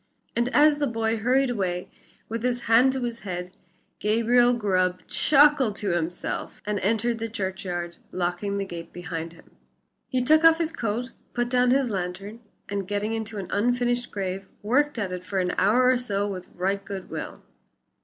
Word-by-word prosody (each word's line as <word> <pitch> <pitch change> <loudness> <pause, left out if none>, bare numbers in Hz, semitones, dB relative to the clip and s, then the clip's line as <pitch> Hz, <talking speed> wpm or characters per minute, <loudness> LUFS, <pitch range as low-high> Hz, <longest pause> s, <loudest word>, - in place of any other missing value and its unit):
And 235 +1 +1
as 295 +2 +5
the 290 - +1
boy 225 -1 0
hurried 255 +3 +2
away, 180 -5 -2 0.4
with 230 0 -4
his 245 0 0
hand 235 +4 +5
to 265 -2 -3
his 235 -1 -3
head, 180 -2 -5 0.5
Gabriel 235 +3 +4
Grubb 185 -6 0
chuckled 285 -6 +4
to 205 -2 -2
himself 175 +1 -3
and 210 -1 -1
entered 225 +4 0
the 225 0 -3
churchyard, 185 -4 -4
locking 180 +3 -2
the 200 - -1
gate 170 -3 -8
behind 165 -1 -5
him. 165 - -19 0.6
He 255 -2 0
took 310 +4 +5
off 325 0 +7
his 330 -1 -1
coat, 240 -2 -3 0.2
put 240 0 0
down 250 0 +3
his 260 -2 +2
lantern, 195 +3 -4 0.3
and 200 -2 -3
getting 205 +2 -1
into 220 -1 -4
an 190 -3 -6
unfinished 245 +2 +1
grave, 190 -1 -4 0.2
worked 280 +6 +2
at 200 -4 -2
it 180 0 -5
for 195 +1 -4
an 180 -1 +1
hour 240 +6 +4
or 255 - +4
so 205 -5 -1
with 185 -3 -6
right 195 +2 -1
good 195 -2 -7
will. - - -6
215 Hz, 175 wpm, -25 LUFS, 190-245 Hz, 0.6 s, off